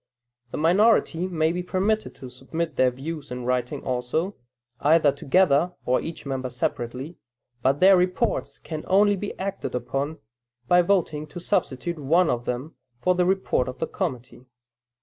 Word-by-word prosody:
The - - -5
minority 180 +1 +3
may 160 -3 +1
be 180 +1 -2
permitted 195 +4 -1
to 130 -2 -10
submit 155 +5 -4
their 130 -1 +4
views 145 +4 -7
in 125 -1 -5
writing 125 -1 -1
also, 130 +10 -1 0.4
either 155 -1 +4
together, 165 +3 +2
or 125 +1 +2
each 165 -2 -7
member 130 -2 -3
separately, 125 +5 -4 0.4
but 135 +3 +2
their 190 +1 +8
reports 185 +5 0
can 155 -2 -6
only 205 +2 +4
be 200 +1 -5
acted 195 -7 -4
upon, 135 +5 -2 0.5
by 175 +4 +6
voting 170 -5 0
to 175 - -8
substitute 170 0 -1
one 165 +5 +3
of 120 0 -2
them 125 +6 -4 0.3
for 180 +9 +2
the 180 0 +2
report 190 -9 +1
of 130 +1 -6
the - - -1
committee. 130 - -5
160 Hz, 155 wpm, -25 LUFS, 130-180 Hz, 0.5 s, their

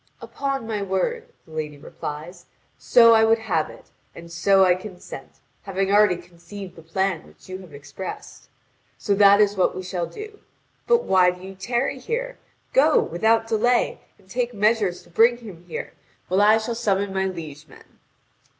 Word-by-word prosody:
"Upon 275 -3 -4
my 215 -2 -3
word," 200 - -2 0.2
the 160 - -19
lady 155 -2 -5
replies, 155 +5 -8 0.3
"so 230 -1 +6
I 220 0 +5
would 225 +1 +4
have 190 -9 -1
it, - - -15 0.2
and 170 0 -11
so 190 +3 +4
I 180 - +5
consent, 180 -7 -9 0.3
having 195 0 -2
already 205 -2 +5
conceived 175 +2 -11
the 165 - -12
plan 175 +1 -2
which - - -20
you 185 0 -7
have 185 -4 -13
expressed; 145 +6 -9 0.5
so 205 - 0
that 200 0 +6
is 205 -1 +3
what 185 - +1
we 185 - -5
shall 180 -2 -3
do. 425 0 -10 0.5
But 475 0 +3
why 185 -1 +4
do 180 0 -6
you 190 0 -8
tarry 240 +7 -2
here? - - -4 0.3
Go, 300 +4 +5
without 225 +6 +1
delay, 235 +2 +1 0.2
and 195 - -25
take 240 +3 -2
measures 210 -3 +1
to 175 - -22
bring 230 +6 +4
him 195 -8 -12
here, 170 - -6 0.4
while 185 +2 +2
I 215 +2 +6
shall 225 +2 -3
summon 200 -4 -1
my 190 0 0
liege 155 -5 -8
men." - - -19
195 Hz, 175 wpm, -23 LUFS, 180-225 Hz, 0.5 s, so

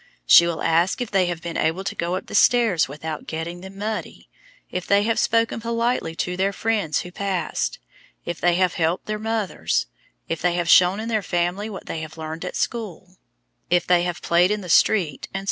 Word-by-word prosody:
She 170 - +8
will 170 -2 -3
ask 170 +7 +2
if 245 -3 -4
they 190 -3 +2
have 175 -1 -4
been 170 -1 -4
able 165 +4 0
to - - -3
go 170 +2 -2
up 185 - -5
the - - -11
stairs 225 -11 +4
without 150 +2 -6
getting 165 +2 -5
them 190 +1 -11
muddy, 215 +2 -5 0.4
if 180 0 -4
they 200 0 +4
have 230 +1 +1
spoken 230 0 +1
politely 230 -7 -1
to 180 +2 -2
their 190 +2 +1
friends 205 -9 0
who 180 - -9
passed, 185 -4 -2 0.5
if 170 -1 -5
they 175 -1 +3
have 185 0 +2
helped 165 +1 -1
their 215 0 -3
mothers, 220 -2 -1 0.4
if 165 - -3
they 175 +1 +1
have 175 -1 -1
shown 180 +3 +5
in 225 - -4
their 220 -2 0
family 180 +4 -1
what 195 - -8
they 165 - -4
have 155 0 -9
learned 160 +1 -6
at 180 - -5
school, 190 -5 -4 0.5
if 175 0 +2
they 180 -1 +4
have 175 -1 -3
played 175 +2 +3
in 210 0 -1
the 180 - -9
street, 170 -4 +2
etc. - - 0
180 Hz, 210 wpm, -23 LUFS, 170-210 Hz, 0.5 s, She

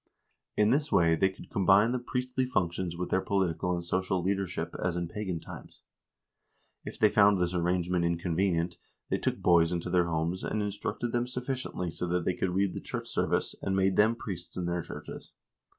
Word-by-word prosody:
In 105 +1 +4
this 145 +2 +1
way 85 -1 +4
they 95 +4 +3
could 95 - -13
combine 100 +3 +4
the 125 - 0
priestly 125 +1 -2
functions 90 -6 -1
with 90 0 -4
their 95 - +3
political 90 -3 0
and 85 - -4
social 95 0 0
leadership, 95 -3 -2
as 90 -1 0
in 85 -1 -2
pagan 95 -2 -4
times. - - -11 1.0
If - - -7
they 110 - +5
found 100 -1 +5
this 90 0 0
arrangement 90 0 +1
inconvenient, 85 0 0 0.3
they - - +1
took - - -1
boys 85 -1 +4
into 85 0 -2
their 90 -1 +3
homes, 85 +3 -1
and 110 - -1
instructed 105 +3 -3
them 120 +1 0
sufficiently 125 -8 -3
so 90 - -4
that 90 -1 0
they 90 - +2
could 90 0 -2
read 95 -1 +1
the - - -5
church - - -5
service, - - 0
and 95 - -1
made 95 0 +2
them 110 +2 +4
priests 95 -7 -7
in 90 - -2
their 85 0 -1
churches. - - -9
90 Hz, 190 wpm, -29 LUFS, 85-105 Hz, 1.0 s, they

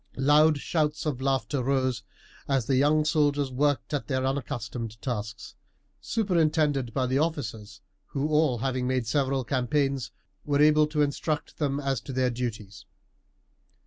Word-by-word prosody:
Loud 150 +3 +5
shouts 150 +1 -1
of 140 -4 -2
laughter 135 -1 0
rose 130 -1 0 0.5
as 135 -4 +1
the 135 - +1
young 150 +3 +3
soldiers 145 -3 +1
worked 140 0 0
at 145 - -2
their 130 -2 0
unaccustomed 120 -4 -4
tasks, 110 -4 -5 0.5
superintended 155 - +1
by 130 +2 0
the 130 +2 +1
officers, 110 -11 -3 0.3
who, 150 -2 +1
having 130 +1 -1
all - - -1
made 130 -2 0
several 135 +2 0
campaigns, 135 +1 0 0.3
were 145 -1 0
able 150 0 +5
to 150 -1 +1
instruct 150 +2 -2
them 140 -2 0
as 135 -4 -1
to 135 - -8
their 130 -1 +1
duties. 115 -4 -6
135 Hz, 145 wpm, -27 LUFS, 125-150 Hz, 0.5 s, Loud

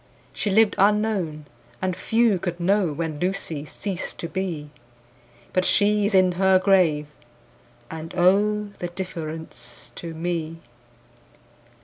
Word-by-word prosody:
She 210 - -1
lived 215 +2 +4
unknown, 200 -7 +1 0.3
and 185 -1 -1
few 225 -2 +2
could 175 -1 -4
know 190 -1 +2
When 155 0 -4
Lucy 175 -5 -2
ceased 190 +3 -4
to 170 - -3
be; 170 -5 -4 0.7
10 - - -29
But 185 - +2
she 205 +1 +3
is 205 - 0
in 185 -1 +5
her 190 +1 +4
grave, 180 -6 +3 0.9
and, 160 0 -7
oh, 205 +3 +3
The 175 - -2
difference 165 -3 -6
to 165 -1 -6
me! 165 -1 -3
180 Hz, 125 wpm, -24 LUFS, 165-200 Hz, 0.9 s, in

